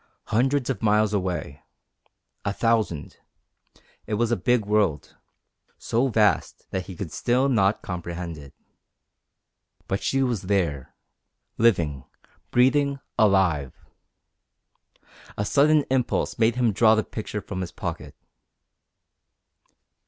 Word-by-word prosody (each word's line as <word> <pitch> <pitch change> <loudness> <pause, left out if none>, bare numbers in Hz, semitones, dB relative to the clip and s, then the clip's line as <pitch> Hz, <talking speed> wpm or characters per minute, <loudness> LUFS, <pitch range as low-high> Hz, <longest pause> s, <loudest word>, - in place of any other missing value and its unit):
Hundreds 130 +3 +2
of 135 - -2
miles 105 -1 +2
away. 90 -8 -3 0.8
A 100 - -1
thousand. 110 -8 -1 0.9
It 105 - -1
was 120 +2 0
a - - +3
big 120 -4 +1
world, 100 -8 0 0.6
so 120 +4 0
vast 105 -7 +1
that 95 -1 -3
he 95 - -8
still 125 - +1
could 135 - +1
not 100 -2 +2
comprehend 85 -1 -5
it. 70 -3 -13 1.3
But 95 - -2
she 135 0 +1
was 120 -7 -1
there, 85 -9 -1 0.6
living, 85 - +2 0.5
breathing, 140 +3 +2 0.2
alive! 95 - +2 1.6
A 105 - -1
sudden 150 +5 +4
impulse 130 -2 0
made 115 +1 +3
him 125 -3 +2
draw 110 +2 +5
the 110 - +1
picture 105 -1 -5
from 95 -2 -6
his 90 - -5
pocket. - - -6
105 Hz, 115 wpm, -24 LUFS, 90-120 Hz, 1.6 s, draw